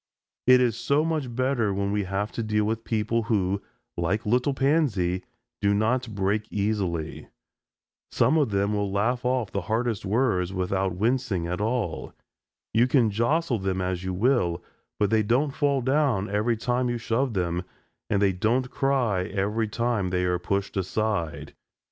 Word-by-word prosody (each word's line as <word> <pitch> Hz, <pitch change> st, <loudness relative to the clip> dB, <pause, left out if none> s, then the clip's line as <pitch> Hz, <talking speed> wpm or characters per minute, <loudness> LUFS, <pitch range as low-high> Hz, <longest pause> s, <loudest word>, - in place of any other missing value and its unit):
It 125 Hz, 0 st, +7 dB
is 120 Hz, -3 st, +1 dB
so 145 Hz, +3 st, +2 dB
much 150 Hz, -7 st, -2 dB
better 130 Hz, -4 st, +1 dB
when 100 Hz, +1 st, -1 dB
we 105 Hz, -1 st, 0 dB
have 100 Hz, +3 st, -2 dB
to -, -, -4 dB
deal 105 Hz, -1 st, +1 dB
with 115 Hz, +1 st, -2 dB
people 115 Hz, +1 st, 0 dB
who, 100 Hz, -4 st, 0 dB, 0.3 s
like 90 Hz, +7 st, -1 dB
little 125 Hz, +5 st, +1 dB
Pansy, 125 Hz, -, +1 dB, 0.4 s
do 100 Hz, 0 st, +3 dB
not 115 Hz, +2 st, 0 dB
break 100 Hz, +2 st, -1 dB
easily. 100 Hz, -6 st, -2 dB, 0.8 s
Some 125 Hz, +7 st, +3 dB
of 150 Hz, -6 st, +3 dB
them 100 Hz, +1 st, 0 dB
will 100 Hz, -1 st, -1 dB
laugh 120 Hz, +5 st, 0 dB
off 125 Hz, -5 st, 0 dB
the 100 Hz, -, -2 dB
hardest 110 Hz, +3 st, -1 dB
words 100 Hz, -4 st, +1 dB
without 95 Hz, 0 st, -1 dB
wincing 110 Hz, -3 st, 0 dB
at 90 Hz, +3 st, -3 dB
all. 115 Hz, +2 st, -2 dB, 0.6 s
You 115 Hz, +3 st, +4 dB
can 125 Hz, -5 st, +3 dB
jostle 120 Hz, +4 st, +1 dB
them 95 Hz, -1 st, -1 dB
as 90 Hz, -1 st, -2 dB
you 95 Hz, -, -2 dB
will, 90 Hz, -6 st, +1 dB, 0.4 s
but 105 Hz, -2 st, +2 dB
they 110 Hz, -1 st, +4 dB
don't 125 Hz, +7 st, +1 dB
fall 140 Hz, -2 st, +1 dB
down 130 Hz, -6 st, +1 dB
every 110 Hz, +3 st, +1 dB
time 125 Hz, +2 st, 0 dB
you 120 Hz, -, -1 dB
shove 120 Hz, +1 st, -1 dB
them, 90 Hz, -1 st, 0 dB, 0.5 s
and 100 Hz, -, +2 dB
they 95 Hz, -1 st, +3 dB
don't 120 Hz, +7 st, 0 dB
cry 125 Hz, -9 st, +1 dB
every 105 Hz, +4 st, -1 dB
time 115 Hz, -3 st, -1 dB
they 90 Hz, 0 st, 0 dB
are 90 Hz, -1 st, 0 dB
pushed 100 Hz, +3 st, -2 dB
aside. 95 Hz, -3 st, -2 dB
110 Hz, 165 wpm, -26 LUFS, 95-125 Hz, 0.8 s, It